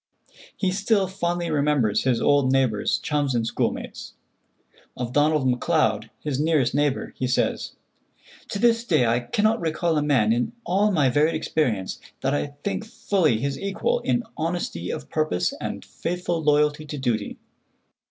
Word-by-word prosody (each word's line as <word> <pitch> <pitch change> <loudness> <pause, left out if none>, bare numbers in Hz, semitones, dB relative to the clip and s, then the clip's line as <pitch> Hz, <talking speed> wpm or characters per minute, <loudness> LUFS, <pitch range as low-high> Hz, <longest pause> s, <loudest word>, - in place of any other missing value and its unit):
He 190 -2 0
still 200 +1 +2
fondly 175 -2 -2
remembers 140 -8 +1
his 125 -3 +2
old 140 -2 +3
neighbors, 130 -6 +2
chums 145 -4 -1
and 115 -1 +1
school - - +1
mates. - - -8 0.8
Of 125 -1 -4
Donald 150 -1 +3
MacLeod, 125 -1 +1
his 145 -3 -2
nearest 150 -5 +2
neighbor, 145 -2 0
he 130 - 0
says: 125 - 0 0.8
"To - - -3
this 230 +1 +3
day 155 - +2
I 115 +1 +2
cannot 215 - +1
recall 165 0 0
a - - 0
man 130 -7 +3
in 120 +1 -1
all 195 +4 +2
my 150 -8 +3
varied 150 +5 +2
experience 110 -12 -1 0.2
that 135 +1 0
I 145 0 -2
think 200 0 -2
fully 190 - +1
his 140 +2 -2
equal 200 - -1
in 240 - 0
honesty 160 - -3
of 65 - -5
purpose 155 -13 0
and - - -5
faithful 175 -1 -3
loyalty 150 0 +2
to 145 - -5
duty." 120 -6 -2
150 Hz, 155 wpm, -24 LUFS, 130-175 Hz, 0.8 s, old